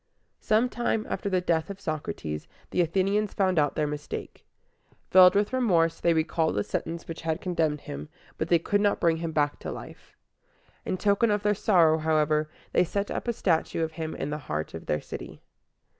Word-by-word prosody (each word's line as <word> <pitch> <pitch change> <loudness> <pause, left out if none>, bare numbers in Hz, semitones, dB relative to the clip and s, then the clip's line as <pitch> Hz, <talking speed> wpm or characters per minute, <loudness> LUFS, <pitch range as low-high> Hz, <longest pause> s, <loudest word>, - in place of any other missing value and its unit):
Some 220 +3 +2
time 240 -3 -1
after 200 - -3
the 185 -2 +1
death 165 -1 0
of 195 -1 -7
Socrates, 85 - -4 0.2
the - - +2
Athenians 195 +5 +1
found 185 -4 +2
out 145 -1 +1
their 155 - +1
mistake. 150 0 -6 0.6
Filled 185 0 +8
with 205 +4 +1
remorse, 170 -10 +2
they 170 -1 +2
recalled 160 0 +1
the 105 - +1
sentence 165 +1 -4
which 165 - -6
had 160 0 -1
condemned 160 -5 -1
him, 70 +2 -7 0.3
but - - -1
they 170 - +5
could 205 +5 0
not 205 -1 +2
bring 165 -1 +2
him 165 0 -3
back 145 -1 0
to - - -5
life. - - -11 0.7
In 185 - -1
token 205 +4 +2
of 205 -1 +1
their 210 0 +3
sorrow, 170 -6 +4
however, 155 -1 +1 0.2
they - - +5
set 200 +3 -2
up - - -4
a 235 - +1
statue 165 -5 0
of 160 - -2
him 160 -1 -5
in 140 - -4
the 150 - -3
heart 75 +1 -3
of 80 - -8
their 75 - 0
city. - - -9
165 Hz, 195 wpm, -27 LUFS, 155-200 Hz, 0.7 s, Filled